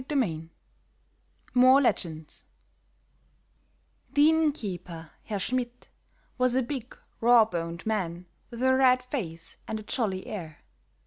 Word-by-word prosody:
CHAPTER 280 +3 -5
VI 165 - 0 1.0
MORE 255 +2 +7
LEGENDS 160 - -2 1.7
THE 295 +2 +5
inn 320 -1 +3
keeper, 175 - -7
Herr 210 - -3
Schmidt, 245 +4 -3 0.5
was 255 -1 +3
a 260 - +3
big, 255 -1 -6 0.2
raw 235 -1 +6
boned 170 -4 -5
man 180 -5 -2 0.2
with 240 0 -6
a 260 0 +5
red 255 -1 +4
face 165 - -5
and 220 - -3
a - - -9
jolly 205 -5 -2
air. 165 -7 -7
225 Hz, 125 wpm, -28 LUFS, 170-255 Hz, 1.7 s, MORE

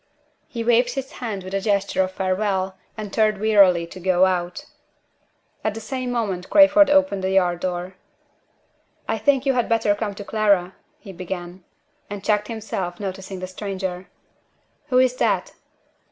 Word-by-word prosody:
_" - - -44 0.4
He 230 -2 -5
waved 240 +1 +3
his 270 -1 -4
hand 215 -6 -5
with 185 +1 -8
a 195 - 0
gesture 200 -1 +1
of 185 - 0
farewell, 190 0 -1 0.2
and 210 -2 -6
turned 215 -2 +2
wearily 195 -5 +4
to 175 +2 -11
go 185 0 +3
out. 180 -1 -2 1.0
At 215 -1 -1
the - - -5
same 255 +1 -4
moment 200 -7 -2
Crayford 295 0 +6
opened 285 -9 +3
the 190 - 0
yard 180 -2 +2
door. 180 0 -3 1.1
"I 225 - -1
think 270 +4 +2
you 270 - +3
had 245 -2 0
better 225 -2 +2
come 205 -1 -4
to 205 - -8
Clara," 200 -4 +1 0.3
he 200 -9 -11
began, 180 0 -7 0.5
and 205 -1 -6
checked 210 0 +1
himself, 200 -6 -4
noticing 190 -1 -6
the - - -3
stranger. 185 -1 -5 0.8
"Who 255 - +1
is 255 0 +3
that?" - - 0
200 Hz, 165 wpm, -22 LUFS, 185-225 Hz, 1.1 s, Crayford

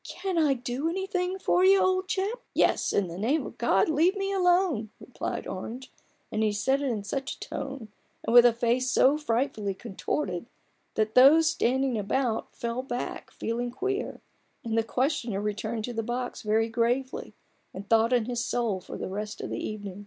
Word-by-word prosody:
Can 375 -3 -2
I 295 -4 +3
do 250 +5 -2
anything 370 0 -2
for 365 -1 +2
you, 385 +1 +6
old 370 0 +2
chap? 410 +4 -1
" - - -38
" - - -48
Yes; - - +2
in 200 -2 +1
the 170 +2 -7
name 265 +7 +1
of - - -10
God 195 -5 +3
leave 320 +5 +3
me 390 0 -1
alone 355 - +2
!" - - -42
replied 250 - -5
Orange; 230 +7 -6 0.4
and 215 - -1
he 215 -1 +2
said 265 +7 +1
it 280 - 0
in 215 -4 -2
such 265 +6 -3
a - - -26
tone, 270 -5 -6 0.4
and - - -1
with 240 0 +10
a 240 - +6
face 240 +2 +1
so 265 +3 +4
frightfully 235 -8 -1
contorted, 220 0 -3 0.5
that 215 0 0
those 285 +6 +7
standing 260 -5 +1
about 225 +3 -1
fell 235 +1 -3
back 250 -2 -5
feeling 240 +2 -3
queer, 390 - -3 0.4
and 225 -2 -2
the 225 - +4
questioner 245 -3 -1
returned 215 +2 -3
to 245 - -5
the 225 - -1
box 245 +2 -4
very 220 +1 +2
gravely, 240 +3 -1 0.4
and 195 +2 -8
thought 225 +2 +4
on 245 -3 +3
his 240 0 -2
soul 225 -8 -1
for - - -8
the - - -4
rest 210 +2 -5
of - - -5
the - - -3
evening. 205 -2 -6
245 Hz, 195 wpm, -27 LUFS, 220-295 Hz, 0.5 s, with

